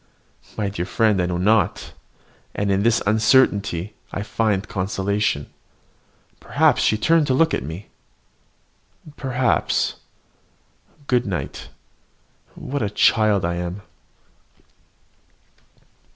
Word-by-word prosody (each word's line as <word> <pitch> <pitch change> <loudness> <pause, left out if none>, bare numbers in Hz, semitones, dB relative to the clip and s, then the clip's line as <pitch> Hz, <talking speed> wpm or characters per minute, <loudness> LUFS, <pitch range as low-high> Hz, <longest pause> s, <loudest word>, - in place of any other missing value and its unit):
My 105 - -1
dear 90 -3 -4
friend, 105 -4 +2
I 90 - 0
know 90 -1 -2
not; 100 +1 +1 0.6
and 100 0 0
in 95 0 +2
this 115 +2 +2
uncertainty 105 -4 +2 0.2
I 100 - -4
find 105 -2 -1
consolation. 95 -4 -2 0.9
Perhaps - - +2
she 110 - +2
turned 160 +6 +3
to 130 - +2
look 165 +4 +3
at - - 0
me. 80 +9 -7 1.3
Perhaps! 130 -2 0 1.1
Good 125 -4 +1
night 95 -4 -5 0.9
what 140 +1 -4
a 105 - 0
child 105 -2 +3
I 85 0 -2
am! 90 +3 -5
105 Hz, 105 wpm, -22 LUFS, 95-115 Hz, 1.3 s, turned